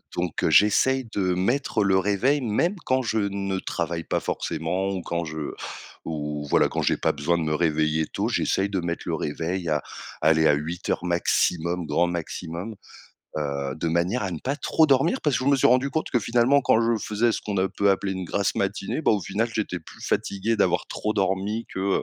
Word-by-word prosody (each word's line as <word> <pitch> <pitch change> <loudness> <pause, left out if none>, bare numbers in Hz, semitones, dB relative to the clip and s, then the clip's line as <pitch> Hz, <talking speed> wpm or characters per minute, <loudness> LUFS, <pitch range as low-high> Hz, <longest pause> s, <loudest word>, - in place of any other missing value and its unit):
donc 85 -2 -1
j'essaye 130 +5 +4
de 95 -2 +1
mettre 110 +3 +1
le 95 -1 +4
réveil 105 +9 +1
même 125 - +1
quand 130 0 +1
je 110 -1 0
ne 100 -1 -1
travaille 85 -2 -3
pas - - -1
forcément 85 +4 -2
ou 95 -2 -3
quand 85 0 -2
je 80 -1 -5 0.5
ou 75 -2 -4
voilà - - +4
quand - - -2
j'ai - - +1
pas - - +1
besoin 75 +4 0
de 85 - -1
me 75 -1 0
réveiller 80 -1 +1
tôt, - - -2
j'essaye 95 +1 +1
de 95 - -1
mettre 85 0 -3
le - - -1
réveil 85 +3 -3
à 75 -2 0 0.4
aller 80 0 +4
à 75 - +5
08:00 85 +4 -2
maximum, 85 0 +1
grand 85 +3 +2
maximum, 85 +3 -5 0.6
heu, 70 -2 -2
de 80 +1 -2
manière 85 +9 0
à 95 - -2
ne 80 - -4
pas 135 - -2
trop 160 +1 +3
dormir 145 - +3
parce 150 -3 +2
que 130 - -2
je 140 - +4
me 140 - +4
suis - - +4
rendu 130 +3 +3
compte 160 - -2
que, 120 - +2
finalement 120 +6 +3
quand 110 - +4
je 115 0 +2
faisais 115 +2 +1
ce - - -2
qu'on 105 -2 -3
a 95 +1 +2
peu 100 +1 +2
appelé 95 0 0
une 95 -1 -4
grasse 100 +3 0
matinée, 100 +9 -2
bah, - - +3
au 105 -2 +2
final 105 +6 -1
j'étais 100 -5 -2
plus 80 - -14
fatigué 100 +4 0
d'avoir - - +1
trop 105 - -2
dormi 100 +3 -1
que, - - -3
heu 95 0 +1
95 Hz, 210 wpm, -25 LUFS, 85-110 Hz, 0.6 s, à